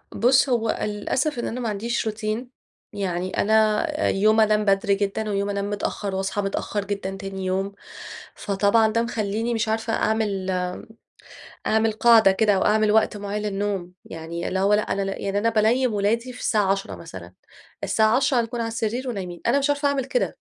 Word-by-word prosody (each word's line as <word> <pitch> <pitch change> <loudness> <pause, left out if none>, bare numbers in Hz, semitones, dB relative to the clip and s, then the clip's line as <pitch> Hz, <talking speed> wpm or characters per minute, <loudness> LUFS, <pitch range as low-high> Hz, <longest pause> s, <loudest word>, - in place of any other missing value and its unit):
بُص 255 +5 +4
هو 230 -3 +1
للأسف 240 +7 -1
إن - - -2
أنا 250 - -4
ما 235 - -2
عنديش 230 +4 -2
روتين 215 +3 -3 0.4
يعني 185 -2 -3
أنا 220 +5 +3 0.2
يوم 215 +3 +3
أنام 215 -1 +3
بدري 200 0 +2
جدًا 205 +2 -2
ويوم 200 0 -1
أنام 200 0 -2
متأخّر 205 -1 -3
وأصحى 195 +2 -1
متأخّر 200 +1 -2
جدًا 195 -1 -4
تاني 195 -1 -6
يوم، 190 +2 -1 0.6
فطبعًا 205 +3 +2
ده 230 - +2
مخليني 225 0 -2
مش 225 -1 -1
عارفة 225 +1 -1
أعمل 205 -4 0 1.2
أعمل 220 0 +2
قاعدة 220 -2 +5
كده 210 +1 +2
أو 190 - +1
أعمل 215 0 +3
وقت 215 -1 +2
معيّن 205 +1 -4
للنوم، 195 -3 -3
يعني 165 +1 -6
اللي 190 - -1
هو 200 +2 +3
لأ 210 - +4
أنا 200 - -2 0.2
يعني 200 0 -2
أنا 230 +3 +2
بانيِّم 230 +2 +2
ولادي 230 +5 0
في 245 - -11
الساعة 205 -5 +1
22:00 150 - -3
مثلًا، 85 +1 -10 0.5
الساعة 220 +2 +3
22:00 265 -1 +2
هنكون 235 +1 -4
على 230 - -1
السرير 230 +3 -2
ونايمين، 180 -6 -5
أنا 275 +4 +3
مش 275 - 0
عارفة 285 0 +1
أعمل 275 -2 0
كده، - - -1
210 Hz, 175 wpm, -23 LUFS, 195-230 Hz, 1.2 s, قاعدة